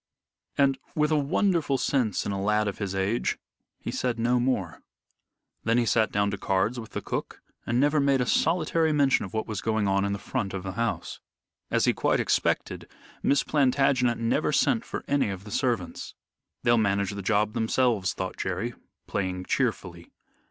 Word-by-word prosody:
And, 135 -1 +3 0.2
with 150 0 +2
a - - +4
wonderful 150 -1 +1
sense 125 -8 0
in - - -2
a 100 -1 -2
lad 105 +1 +1
of 100 - -4
his 100 -2 -3
age, 95 +5 0 0.4
he - - -5
said 125 -2 -1
no 120 +2 +2
more. 110 -10 -1 0.8
Then 115 +1 +2
he 120 - +3
sat 110 0 +2
down 100 0 +1
to 100 - -4
cards 95 +7 0
with 110 - -10
the - - -4
cook, - - -4 0.3
and 120 +2 +1
never 145 +2 +3
made 140 -1 +3
a 125 - +1
solitary 160 +3 +2
mention 140 -6 +3
of 95 - -11
what 110 - -1
was 105 -2 -4
going 110 -2 0
on 100 0 +2
in 100 - 0
the 100 - -1
front 100 0 -3
of 95 - -5
the 95 - -4
house. 115 +4 -3 0.5
As - - +2
he - - +3
quite - - +1
expected, - - 0 0.3
Miss 140 - +2
Plantagenet 130 -3 +2
never 115 0 +1
sent - - +2
for - - -6
any 140 -6 +1
of 95 -1 -6
the 105 - -10
servants. 120 -9 -2 0.5
"They'll 120 -1 +4
manage 100 -2 +1
the 100 0 -5
job 105 +1 +1
themselves," 110 -5 +1
thought 95 0 -4
Jerry, 95 +6 -2 0.3
playing 90 -1 -3
cheerfully. 90 -9 -2
115 Hz, 185 wpm, -27 LUFS, 100-130 Hz, 0.8 s, a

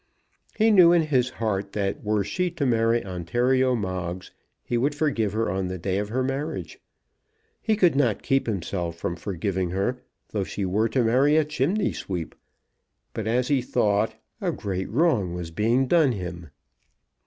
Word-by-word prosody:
He 220 +1 +4
knew 180 -5 +7
in 170 -2 +4
his 130 -5 +1
heart 100 -5 -3
that 100 -1 -2
were 105 -1 +1
she 180 - -1
to 150 -4 -3
marry 115 -2 +2
Ontario 120 +9 +1
Moggs 95 -4 -4 0.3
he 120 - -2
would 140 +5 +1
forgive 130 -9 0
her 115 +1 0
on 95 0 -1
the 95 0 -4
day 95 +3 -1
of 105 0 -3
her 130 +4 0
marriage. 140 +4 -4 0.8
He 220 - +1
could 180 -8 +3
not 125 -7 +1
keep 135 -1 +1
himself 90 -4 -3
from 85 +1 -3
forgiving 95 0 -2
her 100 +8 -1 0.3
though 100 -2 -1
she 100 +1 -4
were 105 +5 +1
to 125 +2 +1
marry 135 +7 +4
a 155 - +3
chimney 155 +8 0
sweep. 90 -4 -5 0.8
But, 110 -1 -4
as 125 +3 +1
he 140 -3 +3
thought, 105 -3 +1 0.3
a - - 0
great 95 -2 -4
wrong 115 - +1
was 85 -2 -5
being 115 +9 +2
done 150 -2 +3
him. 90 -4 -6
115 Hz, 170 wpm, -25 LUFS, 95-135 Hz, 0.8 s, knew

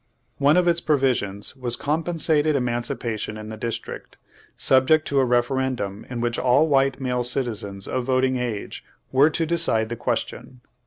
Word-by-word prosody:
One 145 +4 +4
of 180 -1 +3
its 170 0 +3
provisions 130 -10 0
was 125 -3 0
compensated 155 -1 0
emancipation 120 -3 -3
in 110 0 -8
the 110 - -6
District, 115 +1 -6 0.4
sub 130 0 +3
ject 155 +1 +3
to 140 - +2
a 130 - +3
referendum 120 -4 -1
in 120 -2 -4
which 120 0 -1
all 130 +5 +3
white 135 -2 +2
male 125 -2 -1
citizens 110 -6 0
of 130 - -2
voting 130 0 +1
age 120 -5 -4 0.3
were 140 +4 +5
to 165 +1 -1
decide 155 -10 +1
the 120 - -3
question. 120 +1 -4
125 Hz, 160 wpm, -23 LUFS, 120-140 Hz, 0.4 s, were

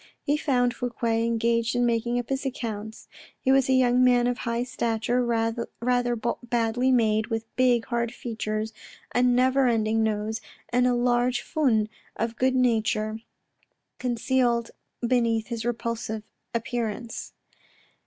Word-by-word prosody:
He 290 - +2
found 250 -5 +1
Fouque 245 -1 -6
engaged 230 0 +1
in 245 0 +2
making 235 +1 +1
up 245 -1 -3
his 270 0 -1
accounts. 220 -5 -5 0.3
He 260 - +1
was 270 -1 +4
a - - +4
young 250 -1 +4
man 245 -1 +4
of 245 -1 0
high 235 +1 -1
stature, 235 0 0
rather 235 +1 0 0.3
badly 240 +1 +1
made, 220 -3 +2
with 225 -1 -4
big, 245 -2 +3
hard 235 -1 -1
features, 220 -2 -4 0.4
a 245 - +3
never 255 +2 +4
ending 225 -1 +2
nose, 220 0 -1 0.3
and 250 +1 +3
a 250 - +2
large 245 0 +2
fund 245 -9 +1 0.3
of 230 0 -2
good 260 +2 +2
nature 220 -3 +1 0.8
concealed 240 -1 +1 0.4
beneath 230 -3 +1
this 235 -1 -3
repulsive 230 -2 -3 0.3
appearance. 235 -1 -3
235 Hz, 135 wpm, -26 LUFS, 225-250 Hz, 0.8 s, was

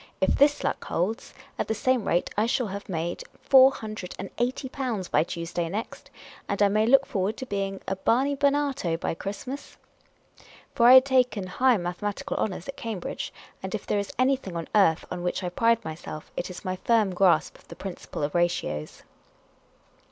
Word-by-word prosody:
If - - +2
this 290 +1 +3
luck - - -1
holds, 195 +7 -2 0.3
at - - -1
the 220 - -1
same 255 -1 +1
rate, 175 - +1
I 215 +2 +2
shall 245 +1 +1
have 200 0 -6
made 170 -1 -3 0.2
four 265 -1 +8
hundred 215 -7 -7
and 195 - -6
eighty 255 +3 -1
pounds 250 -8 -3
by - - +3
Tuesday 170 0 -4
next, 255 - -6 0.4
and 200 - -1
I 205 -1 +5
may 215 +2 +2
look 275 +2 +6
forward 200 0 -2
to 260 - -5
being 195 -3 -3
a 195 - -1
Barney 260 +8 +1
Barnato 280 - +1
by - - -1
Christmas." 255 - -7 1.0
For 235 - +4
I 250 - +10
had 260 0 +9
taken 250 -7 +2
high 250 +6 +3
mathematical 200 +9 -3
honours 185 -4 -2
at 275 - -7
Cambridge, 220 -6 -5 0.3
and 190 +2 -4
if 210 - -6
there 205 - 0
is 200 - -4
anything 255 -7 +1
on 165 - -5
earth 195 -7 +4
on 180 - -4
which 180 +2 -2
I 180 - -1
pride 230 +4 +2
myself, 155 -1 -7
it - - -3
is 180 - -9
my 185 0 -2
firm 215 -2 +2
grasp 180 -1 +2
of - - -23
the 170 - -10
principle 175 -4 -6
of 145 - -1
ratios. 170 - -1
205 Hz, 190 wpm, -26 LUFS, 180-255 Hz, 1.0 s, I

